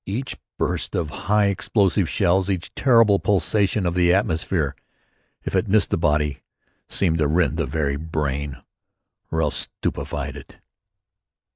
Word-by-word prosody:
Each 120 +7 -3 0.2
burst - - -2
of 75 -3 -2 0.2
high 105 0 +4
explosive 100 -2 +1
shells, 95 0 +2
each 95 -2 -3
terrible 115 -6 +4
pulsation 100 +1 +1
of 85 - 0
the 90 -1 +3
atmosphere, 80 -5 0 0.7
if - - -3
it 95 +4 +1
missed 105 +1 +2
the - - +3
body, 75 -3 +1 0.5
seemed 85 -4 0
to 75 - +2
rend 85 +4 +1
the - - -1
very 70 -3 -1
brain, 70 -3 -3 0.7
or 80 0 0
else 75 - -1
stupefied - - -3
it. - - -12
90 Hz, 140 wpm, -22 LUFS, 75-100 Hz, 0.7 s, high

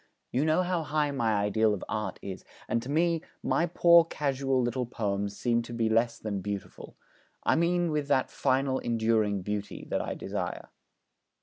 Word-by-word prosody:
You 135 +5 +1
know 160 +3 +3
how 180 -1 0
high 150 -1 0
my 115 -5 +1
ideal 105 +1 +2
of 95 - -8
Art 105 -4 -3
is; 95 -1 -6 0.2
and 115 +1 0
to 125 - -8
me 165 +2 +2 0.2
my 170 - +2
poor 170 0 +6
casual 135 -4 -1
little 120 0 -1
poems 100 -3 -2
seem 120 -1 +1
to 120 0 -8
be 115 -1 +1
less 115 +1 +2
than 100 -3 -4
beautiful 100 0 -6 0.5
I - - +3
mean 175 0 +2
with 150 -2 -1
that 130 -2 +2
final 130 0 +1
enduring 110 -4 +1
beauty 105 +1 -4
that - - +1
I - - -4
desire.' - - -4
120 Hz, 175 wpm, -29 LUFS, 110-150 Hz, 0.5 s, poor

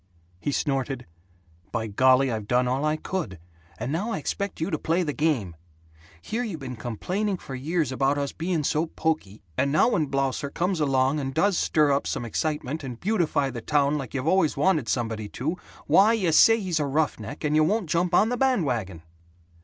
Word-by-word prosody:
He 145 - -2
snorted, 135 -2 -1 0.7
"By 115 -1 -2
golly, 130 +5 +3
I've 110 -2 -4
done 125 +2 +2
all 130 +3 0
I 155 0 +1
could, 155 - -4 0.4
and 135 - -4
now 185 +9 -1
I - - -1
expect 200 +6 -3
you 160 - -2
to 155 - -1
play 170 +3 +1
the 150 -3 -2
game. 135 - 0 0.7
Here 230 - -2
you 205 -9 -4
been 130 -3 -6
complaining 180 - -2
for 135 - -9
years 150 +2 -1
about 135 +2 +1
us 140 -1 -2
being 165 -1 -2
so 155 +4 0
poky, 155 -12 -3 0.2
and 140 +1 +2
now 155 - +4
when 155 -10 +1
Blausser 135 +1 -1
comes 180 +4 -1
along 135 0 +2
and 135 -1 -4
does 195 +4 +3
stir 150 -3 +2
up 140 0 +1
excitement 150 +4 -3
and 125 -3 -6
beautify 170 -9 0
the 120 -1 -6
town 145 +2 +1
like 135 0 -7
you've 130 0 -2
always 165 -4 +2
wanted 150 -5 +2
somebody 110 -3 -2
to, 155 +8 -1 0.3
why, 210 +4 +5
you 190 -7 +1
say 225 +8 +6
he's 180 -6 -1
a 145 - 0
roughneck, 140 -3 -2
and 150 0 +1
you 155 - +5
won't 200 +3 +1
jump 175 +3 +1
on 215 - +4
the 245 - -1
band 255 -9 +2
wagon." 100 - -3
150 Hz, 195 wpm, -25 LUFS, 130-170 Hz, 0.7 s, say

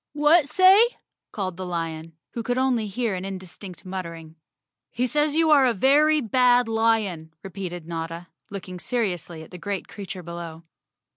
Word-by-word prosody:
"What 295 +1 +4
say?" 380 +4 +7 0.5
called 185 -4 -4
the 185 - -5
lion, 165 -2 -4 0.2
who 235 - -4
could 245 +2 -1
only 255 -4 +1
hear 225 +1 -2
an 185 0 -4
indistinct 185 -1 -8
muttering. 170 -4 -7 0.5
"He 245 - -1
says 295 +3 +1
you 320 -1 +3
are 280 -3 +6
a 240 - +1
very 295 +7 +4
bad 245 +1 +3
lion," 220 -8 0
repeated 180 -3 -6
Notta, 165 +1 -5 0.2
looking 185 -3 -7
seriously 175 -5 -3
at - - -15
the 180 - -9
great 195 +3 -4
creature 190 -3 -8
below. 170 -1 -8
195 Hz, 155 wpm, -24 LUFS, 170-250 Hz, 0.5 s, say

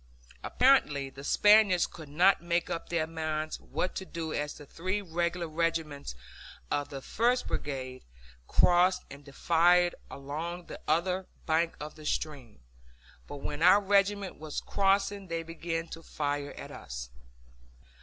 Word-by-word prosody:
Apparently 150 - +3
the 135 +1 -11
Spaniards 205 +1 +5
could 160 -4 -11
not 180 +6 +4
make 170 0 -1
up 165 - -4
their 170 -2 +1
minds 155 -1 -3
what 185 - -3
to - - -3
do 165 -4 -5
as 150 0 -2
the 145 - -11
three 185 +8 -2
regular 170 -1 -2
regiments 160 - -2 0.6
of 145 0 -1
the 135 -1 -7
first 245 +3 +1
brigade 130 -3 -4 0.4
crossed 180 +1 +4
and 140 +1 -10
defiled 175 +5 +3 0.2
along 160 +6 -5
the - - -9
other 180 +4 +1 0.2
bank 165 +1 +1
of 150 +1 -6
the 155 -1 -13
stream, 135 - -3 0.7
but 145 - -8
when 145 +1 -4
our 185 +4 +7
regiment 200 -1 +1
was 155 -1 -4
crossing 200 0 +1
they 165 -1 -3
began 165 0 -4
to 165 - -8
fire 145 -2 -3
at - - -9
us. 60 0 -7
165 Hz, 145 wpm, -30 LUFS, 145-180 Hz, 0.7 s, our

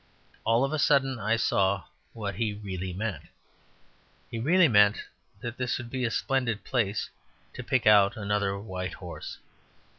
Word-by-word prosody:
All 115 +3 +3
of 135 - -3
a 155 - 0
sudden 135 -3 +3
I 110 +3 +1
saw 100 -4 +1 0.3
what 105 -4 -4
he 105 +2 -2
really 95 -3 -5
meant. 100 -3 -4 1.1
He 115 - -4
really 170 +8 +5
meant 105 -4 +4 0.4
that 120 -1 -5
this 125 -1 -1
would 120 -2 -8
be 130 -1 -1
a - - +1
splendid 125 -3 -1
place 110 -6 -1 0.4
to 125 - -7
pick 130 0 0
out 105 -1 +6
another 100 -1 -1
white 95 -3 -5
horse. 90 -2 -8
110 Hz, 155 wpm, -28 LUFS, 100-125 Hz, 1.1 s, out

